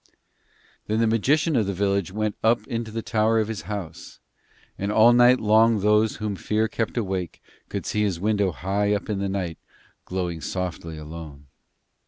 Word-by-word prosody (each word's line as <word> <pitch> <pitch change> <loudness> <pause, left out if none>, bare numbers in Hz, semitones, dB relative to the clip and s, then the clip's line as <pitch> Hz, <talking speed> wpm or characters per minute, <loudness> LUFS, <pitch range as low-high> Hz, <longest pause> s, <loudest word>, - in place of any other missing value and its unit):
Then 110 +1 0
the 115 - +3
magician 145 +8 +2
of 110 -5 +2
the 100 - -2
village 100 -1 0
went 105 +1 -2
up 110 -1 +3
into 115 -1 -4
the 115 +1 -5
tower 110 +1 +2
of 110 - 0
his 110 -3 -4
house, 90 -6 -7 0.6
and 100 +1 -3
all 110 +3 +6
night 125 +1 +6
long 110 0 +4
those 105 +1 +3
whom 105 -2 -3
fear 110 +3 0
kept 115 +2 -3
awake 95 -5 -3 0.3
could - - -4
see 105 - -1
his 100 -5 0
window 100 -1 +1
high 100 +5 0
up 105 - -4
in 100 - -2
the 100 0 -1
night 90 -4 -3 0.5
glowing 90 -3 -3
softly 85 -3 -4
alone. 75 -2 -9
105 Hz, 175 wpm, -24 LUFS, 95-110 Hz, 0.6 s, all